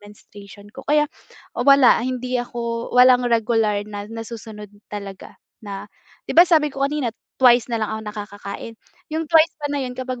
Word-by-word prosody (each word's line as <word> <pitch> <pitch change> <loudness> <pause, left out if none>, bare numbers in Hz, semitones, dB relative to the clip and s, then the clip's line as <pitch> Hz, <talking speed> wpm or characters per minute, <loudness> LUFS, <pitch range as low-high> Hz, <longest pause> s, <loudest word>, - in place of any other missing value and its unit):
menstruation 205 0 -15
ko. 265 - -9
Kaya 300 0 +4 0.5
wala, 275 -4 +5
hindi 255 +1 -2
ako 235 -1 -4
walang 250 0 +7
regular 225 -2 +1
na 205 0 -7
nasusunod 225 -2 -8 0.2
talaga 200 -2 -9 0.3
na 200 -1 -6 0.4
'di - - -5
ba 345 - +10
sabi 310 -3 +4
ko 275 - -8
kanina 280 -5 -2 0.3
twice 245 -2 +5
na 235 - -1
lang 215 - -2
ako 220 - -4
nakakakain, 205 +1 -8 0.4
yung 320 +1 -1
twice 325 0 +5
pa 290 - -2
na 285 - -1
yun 250 - -5
kapag 255 -1 -5
235 Hz, 165 wpm, -21 LUFS, 210-260 Hz, 0.5 s, ba